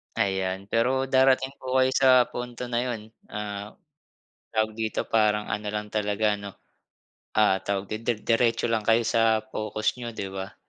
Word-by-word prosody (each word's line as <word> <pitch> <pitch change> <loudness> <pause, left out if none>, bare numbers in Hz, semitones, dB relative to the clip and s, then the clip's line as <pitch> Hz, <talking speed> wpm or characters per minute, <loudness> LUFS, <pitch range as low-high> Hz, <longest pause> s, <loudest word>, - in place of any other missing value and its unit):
Ayan, 95 -2 -1
pero 130 +3 +1
darating 130 +1 +3
po 130 0 -5
kayo 130 - +4
sa 130 -1 +5
punto 125 0 -6
na 120 +1 0
yun. 110 -3 -5 0.2
Ah, 105 -1 -6 0.8
tawag 110 -1 0
dito, 110 -1 -2
parang 105 -1 +2
ano 105 +1 -3
lang 105 0 -3
talaga 105 0 0
'no, 100 -1 -8 0.8
ah, 105 -3 +4
tawag, 100 0 -3
d 115 -1 -2
diretso 115 0 +2
lang 110 -2 0
kayo 115 +1 +4
sa 115 -1 +2
focus 110 +1 -2
niyo, 120 -2 -6
di 100 -3 -5
ba? 95 0 -6
110 Hz, 155 wpm, -26 LUFS, 105-120 Hz, 0.8 s, sa